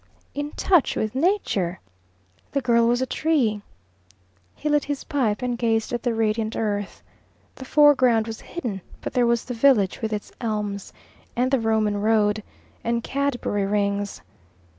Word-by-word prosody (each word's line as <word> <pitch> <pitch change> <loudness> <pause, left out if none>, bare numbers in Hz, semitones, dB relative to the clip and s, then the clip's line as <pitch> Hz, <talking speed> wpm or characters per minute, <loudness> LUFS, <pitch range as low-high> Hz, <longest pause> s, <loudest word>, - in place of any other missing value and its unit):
In 290 +1 -3
touch 355 -7 +2
with 215 -1 -1
Nature! 260 - 0 0.7
The 280 - +1
girl 235 -2 +3
was 245 +2 +2
a - - 0
tree! 260 -9 +1 0.9
He 300 - -5
lit 295 -1 +2
his 285 -1 -3
pipe 240 -6 -1
and 245 -1 0
gazed 225 -1 0
at 240 - -1
the 240 -2 -1
radiant 220 0 0
earth. 205 -2 -3 0.5
The 260 - -10
foreground 260 -6 +5
was 225 -1 -7
hidden, 235 - -5 0.2
but - - -5
there 245 -2 +3
was 235 -1 +1
the 250 - -4
village 230 -6 +3
with 220 -1 -2
its 210 -1 -4
elms, 210 -3 -3 0.4
and 250 +2 +1
the 270 - +3
Roman 215 -2 +1
Road, 215 -1 +2 0.4
and 235 0 0
Cadbury 245 -8 -1
Rings. 200 0 -1
230 Hz, 155 wpm, -24 LUFS, 210-260 Hz, 0.9 s, foreground